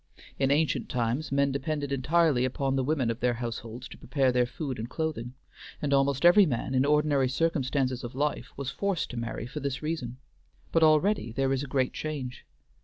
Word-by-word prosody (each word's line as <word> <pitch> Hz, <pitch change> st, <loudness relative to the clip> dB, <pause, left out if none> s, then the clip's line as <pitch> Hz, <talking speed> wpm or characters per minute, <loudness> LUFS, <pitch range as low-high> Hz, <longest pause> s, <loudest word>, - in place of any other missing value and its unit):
In 135 Hz, -1 st, +2 dB
ancient 150 Hz, +2 st, +1 dB
times 125 Hz, +5 st, -1 dB
men 140 Hz, 0 st, +2 dB
depended 145 Hz, +1 st, -2 dB
entirely 145 Hz, 0 st, +2 dB
upon 135 Hz, +1 st, 0 dB
the 135 Hz, -, +1 dB
women 135 Hz, -4 st, +1 dB
of 115 Hz, -, -6 dB
their 125 Hz, -1 st, +1 dB
households 115 Hz, 0 st, -6 dB
to -, -, -12 dB
prepare 135 Hz, 0 st, +1 dB
their 125 Hz, -1 st, +2 dB
food 135 Hz, -1 st, -5 dB
and 115 Hz, +2 st, -5 dB
clothing, 135 Hz, -7 st, -3 dB, 0.4 s
and 145 Hz, -1 st, -1 dB
almost 135 Hz, +2 st, +2 dB
every 180 Hz, +2 st, +7 dB
man 130 Hz, -1 st, -2 dB
in 130 Hz, +1 st, +3 dB
ordinary 145 Hz, -3 st, +3 dB
circumstances 135 Hz, -4 st, 0 dB
of 120 Hz, +1 st, -7 dB
life 140 Hz, -4 st, -1 dB
was 135 Hz, -1 st, -3 dB
forced 195 Hz, +4 st, -2 dB
to 125 Hz, -, -7 dB
marry 115 Hz, 0 st, -4 dB
for 130 Hz, +5 st, -6 dB
this 140 Hz, 0 st, -3 dB
reason; 135 Hz, -6 st, -3 dB, 0.5 s
but 165 Hz, -, +3 dB
already 155 Hz, -, +3 dB
there 135 Hz, +3 st, 0 dB
is 135 Hz, -, 0 dB
a -, -, -5 dB
great 130 Hz, -1 st, 0 dB
change. 140 Hz, -5 st, -5 dB
135 Hz, 190 wpm, -28 LUFS, 125-150 Hz, 0.5 s, every